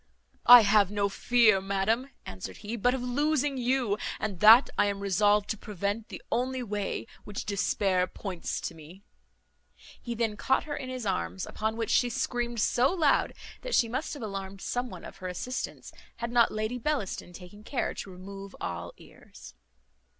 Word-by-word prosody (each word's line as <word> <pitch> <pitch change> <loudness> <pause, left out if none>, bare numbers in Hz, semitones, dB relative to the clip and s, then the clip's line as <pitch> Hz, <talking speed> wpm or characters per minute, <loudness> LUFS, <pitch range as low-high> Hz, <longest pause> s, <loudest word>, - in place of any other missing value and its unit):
"I 245 0 +12
have 205 -2 +4
no 200 -1 0
fear, 215 -2 +4
madam," 200 +7 0 0.2
answered 95 0 -7
he, 220 +3 -3
"but 245 +3 +2
of 255 - -4
losing 285 +2 0
you, 245 -4 +1 0.2
and 200 -5 -3
that 225 +6 +8
I 205 - +3
am 200 -1 -2
resolved 205 +1 +2
to 220 - -4
prevent, 205 +1 -3
the - - -9
only 255 +1 -1
way 205 -3 -3 0.2
which 205 -1 -6
despair 195 -2 +1
points 180 -1 -5
to - - -4
me." 165 +5 -14 1.0
He 235 -1 -5
then 220 -2 -1
caught 265 - +1
her 295 -1 -4
in 255 - -6
his 255 -3 -5
arms: 90 - -2
upon 220 +1 -3
which 225 -1 -2
she 245 - +3
screamed 240 0 -2
so 240 +5 +3
loud, 325 -6 +2 0.3
that - - -1
she 235 - +4
must 260 +7 -3
have 285 - -7
alarmed 195 -2 -6
some 245 0 -2
one 180 -5 -10
to - - -8
her 185 - -8
assistance, 215 +8 -5 0.2
had 235 0 -4
not 240 -1 +4
Lady 215 +3 -2
Bellaston 245 -10 -2
taken 180 +4 -12
care 250 +2 -2
to - - -7
remove 195 +2 -10
all 85 -1 -5
ears. - - -15
215 Hz, 175 wpm, -28 LUFS, 195-245 Hz, 1.0 s, I